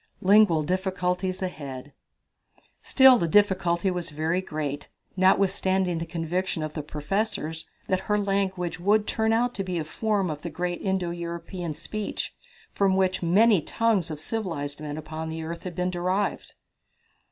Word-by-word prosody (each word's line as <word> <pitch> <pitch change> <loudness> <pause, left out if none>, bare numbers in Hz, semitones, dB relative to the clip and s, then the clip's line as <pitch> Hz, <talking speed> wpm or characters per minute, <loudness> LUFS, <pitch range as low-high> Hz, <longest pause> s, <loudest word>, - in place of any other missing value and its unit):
Lingual 190 -5 +5
Difficulties 185 +1 -1
Ahead. 140 -5 -6 0.9
Still 265 -2 +6
the 170 - +1
difficulty 190 -1 +3
was 180 -2 -3
very 160 +4 -1
great, 150 -5 -4 0.3
notwithstanding 190 -1 +2
the 165 - -4
conviction 170 +1 -2
of 155 0 -4
the 150 - -3
professors 160 +1 -3 0.2
that 185 - +1
her 210 - +3
language 195 -3 -1
would 205 +4 +3
turn 220 0 0
out 240 +2 +2
to 195 - -3
be 185 -2 -3
a 160 - -1
form 195 +2 -1
of 150 -1 -6
the 170 - -5
great 175 +2 -3
Indo 190 -3 -1
European 170 -1 -5
speech 215 +5 -4 0.4
from 195 -1 +2
which 190 -1 +2
the 170 - -3
many 205 +1 +5
tongues 220 -2 +1
of 155 -2 -5
civilized 155 -7 -3
men 150 -1 -5
upon 155 +1 -5
the 160 0 -5
earth 170 +3 -6
had 180 -2 -5
been 180 0 0
derived. 185 +3 -1
180 Hz, 155 wpm, -26 LUFS, 160-195 Hz, 0.9 s, Still